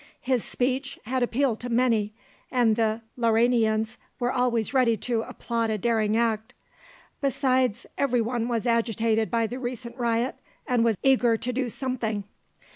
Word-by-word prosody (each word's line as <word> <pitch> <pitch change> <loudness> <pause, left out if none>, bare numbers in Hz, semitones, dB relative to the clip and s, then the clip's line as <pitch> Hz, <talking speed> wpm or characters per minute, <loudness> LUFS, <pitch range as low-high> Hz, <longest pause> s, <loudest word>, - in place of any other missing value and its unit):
His 255 -3 0
speech 265 +2 -2
had 255 +3 -1
appealed 245 -1 +1
to 245 - -5
many, 230 -3 +2 0.4
and 240 -4 +3
the 225 0 0 0.2
Lauranians 225 -1 +2 0.2
were 245 0 +1
always 245 -2 0
ready 245 -4 +3
to 235 +1 -1
applaud 230 -1 -2
a 215 - 0
daring 220 0 +1
act. 225 -2 0 0.7
Besides, 260 -4 +1
every 250 -3 +2
one 235 0 -1
was 235 -1 -1
agitated 225 -1 +1
by 230 -1 +1
the 245 +3 -5
recent 240 -1 -5
riot 235 0 0 0.3
and 245 -2 +2
was 225 -3 +2
eager 245 -4 +4
to 250 +3 -3
do 255 0 -1
something. 230 -5 -2
235 Hz, 150 wpm, -26 LUFS, 225-250 Hz, 0.7 s, eager